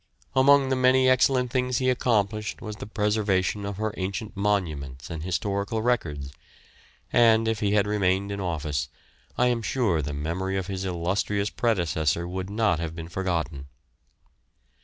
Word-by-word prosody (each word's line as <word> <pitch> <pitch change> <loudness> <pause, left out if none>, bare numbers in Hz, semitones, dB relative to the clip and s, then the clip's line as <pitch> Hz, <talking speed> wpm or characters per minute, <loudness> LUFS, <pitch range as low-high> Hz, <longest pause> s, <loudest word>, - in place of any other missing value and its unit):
Among 135 0 +5
the 130 - +2
many 130 0 +4
excellent 130 -1 +3
things 125 -1 0
he 130 - 0
accomplished 110 -4 0
was 110 -2 -7
the - - -7
preservation 105 -2 0
of 100 -2 -5
her 110 0 -2
ancient 100 +3 -4
monuments 80 -11 -2
and 80 -1 -5
historical 100 +5 -2
records; 75 - -1 0.8
and, 115 -1 +5
if 115 -2 0
he 100 -1 +1
had 105 -1 +3
remained 100 -1 +1
in 100 - -4
office, 75 -5 -2 0.5
I 125 - +3
am 120 -1 0
sure 105 -8 +1
the 70 0 -4
memory 85 +6 -2
of 95 - -2
his 95 0 -4
illustrious 95 +3 -1
predecessor 85 - 0
would 95 +1 -4
not 105 -5 +1
have 80 -1 -4
been 80 -1 -7
forgotten. 85 -6 -2
100 Hz, 155 wpm, -26 LUFS, 85-110 Hz, 0.8 s, Among